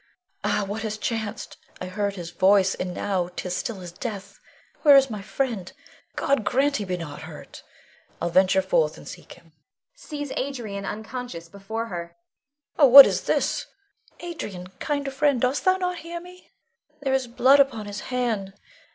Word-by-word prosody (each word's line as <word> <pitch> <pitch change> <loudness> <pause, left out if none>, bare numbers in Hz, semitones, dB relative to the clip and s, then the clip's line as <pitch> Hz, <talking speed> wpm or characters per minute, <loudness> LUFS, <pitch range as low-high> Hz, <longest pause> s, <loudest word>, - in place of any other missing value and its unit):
Ah, 210 0 +1
what 205 +3 -4
has 215 -1 -3
chanced? 220 -1 -4 0.2
I - - -5
heard 200 +2 -2
his 175 -3 -7
voice, 190 +2 +4
and 180 0 -4
now 180 -1 -2
'tis 180 -1 -3
still 225 -7 -4
as 175 -1 -8
death. 200 +1 -7 0.4
Where 290 -3 +8
is 270 -2 +3
my 210 -2 -5
friend? 215 -3 -3 0.4
God 275 -5 +1
grant 275 +7 +1
he 205 - -4
be 180 -1 -2
not 150 -4 -7
hurt! - - -11 0.6
I'll 170 - -2
venture 190 +1 +4
forth 160 -5 +1
and - - -13
seek - - -10
him 170 -2 -21 0.4
[sees 290 -2 -7
Adrian 230 -8 -4
unconscious 220 -5 -6
before 220 +5 -5
her]. 170 -1 -6 0.6
Oh, 285 - +8
what 275 +2 +12
is - - -1
this? - - 0 0.5
Adrian, 205 - -7
kind 285 -2 -2
friend, 280 -2 +2
dost 255 +4 0
thou 375 0 +4
not 360 -1 -2
hear 340 +1 -6
me? 360 +1 -15 0.5
There 270 -2 0
is 265 -2 0
blood 260 +4 +4
upon 255 -6 +2
his 205 0 -6
hand! 230 -6 -1
215 Hz, 170 wpm, -24 LUFS, 190-270 Hz, 0.6 s, what